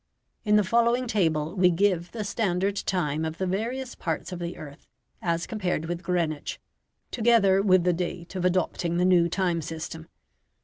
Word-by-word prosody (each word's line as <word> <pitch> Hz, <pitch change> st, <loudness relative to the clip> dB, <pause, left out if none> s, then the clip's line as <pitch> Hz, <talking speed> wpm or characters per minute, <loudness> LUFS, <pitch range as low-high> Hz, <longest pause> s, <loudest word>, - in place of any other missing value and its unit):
In 210 Hz, -1 st, +3 dB
the 210 Hz, -, +5 dB
following 235 Hz, +4 st, +2 dB
table 160 Hz, -8 st, 0 dB
we 180 Hz, -2 st, +5 dB
give 175 Hz, -1 st, +1 dB
the 220 Hz, -2 st, -4 dB
standard 200 Hz, -2 st, 0 dB
time 160 Hz, -6 st, -1 dB
of 160 Hz, 0 st, -3 dB
the 190 Hz, -, -1 dB
various 235 Hz, +7 st, -3 dB
parts 165 Hz, +2 st, -4 dB
of 180 Hz, -, -5 dB
the 170 Hz, 0 st, -5 dB
earth 145 Hz, -2 st, -11 dB, 0.3 s
as 170 Hz, -1 st, -1 dB
compared 180 Hz, -7 st, -2 dB
with 175 Hz, +1 st, -4 dB
Greenwich, 170 Hz, -4 st, -2 dB, 0.5 s
together 215 Hz, -5 st, +4 dB
with 185 Hz, -3 st, +4 dB
the 180 Hz, 0 st, +3 dB
date 175 Hz, 0 st, -4 dB
of 185 Hz, -, -2 dB
adopting 180 Hz, -1 st, 0 dB
the 180 Hz, -, +2 dB
new 175 Hz, -2 st, +4 dB
time 175 Hz, -2 st, 0 dB
system. 160 Hz, +1 st, -7 dB
180 Hz, 170 wpm, -26 LUFS, 170-200 Hz, 0.5 s, the